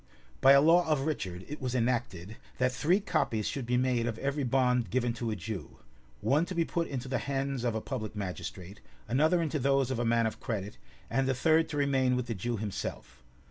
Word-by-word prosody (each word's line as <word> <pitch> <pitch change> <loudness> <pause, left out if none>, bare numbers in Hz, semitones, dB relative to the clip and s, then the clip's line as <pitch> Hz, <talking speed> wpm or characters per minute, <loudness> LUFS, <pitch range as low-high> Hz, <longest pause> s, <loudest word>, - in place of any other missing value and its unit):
By 135 +1 +8
a 140 - +7
law 170 +3 +5
of 150 -3 +2
Richard, 95 - -3
it 150 - -7
was 130 -1 -2
enacted, 115 -5 -1 0.2
that 125 0 +2
three 165 +9 +2
copies 110 - 0
should 130 -4 -4
be 125 0 +2
made 125 -2 +1
of 115 -2 -3
every 140 +3 -1
bond 125 -1 +2
given 120 -1 0
to 115 0 -3
a 110 - -1
Jew; 100 -3 -6 0.4
one 150 +4 +3
to 185 - -5
be 170 -1 +2
put 170 0 -1
into 135 -1 -4
the 130 - -1
hands 135 -2 -2
of 120 -2 0
a 110 - -1
public 110 -5 -5
magistrate, 95 -1 -6 0.3
another 155 +9 +3
into 155 -1 -1
those 135 -1 +2
of 125 - -2
a - - +1
man 115 0 +2
of 110 - -3
credit, 105 -3 -4 0.3
and 135 +3 0
a 130 - +1
third 160 +4 +3
to 150 - -4
remain 135 -3 +2
with 125 -1 -1
the 115 - -3
Jew 115 +4 -3
himself. 105 - -5
125 Hz, 220 wpm, -30 LUFS, 115-140 Hz, 0.4 s, By